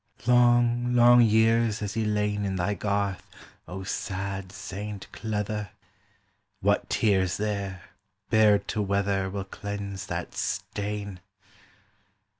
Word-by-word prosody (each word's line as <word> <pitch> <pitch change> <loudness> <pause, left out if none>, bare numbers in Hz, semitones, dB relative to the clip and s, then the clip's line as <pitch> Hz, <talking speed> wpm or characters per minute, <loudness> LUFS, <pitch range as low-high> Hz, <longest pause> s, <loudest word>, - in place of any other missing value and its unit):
Long 120 0 +4
long 120 0 +7
years 110 0 +3
has 105 -1 -3
he 110 0 -1
lain 105 -1 0
In 95 -1 -1
thy 95 +3 0
garth, 100 -1 -2 0.4
O 95 +3 -6
sad 95 0 -4
Saint 100 0 -7
Cleather: 105 -1 -3 0.9
What - - +1
tears 95 -4 +2
there, 100 -3 -3 0.5
bared 105 -2 +4
to 105 - -1
weather, 100 -1 0
Will 100 0 -4
cleanse 100 0 -6
that 85 -2 -4
stain! 100 +1 -4
100 Hz, 110 wpm, -27 LUFS, 95-110 Hz, 0.9 s, long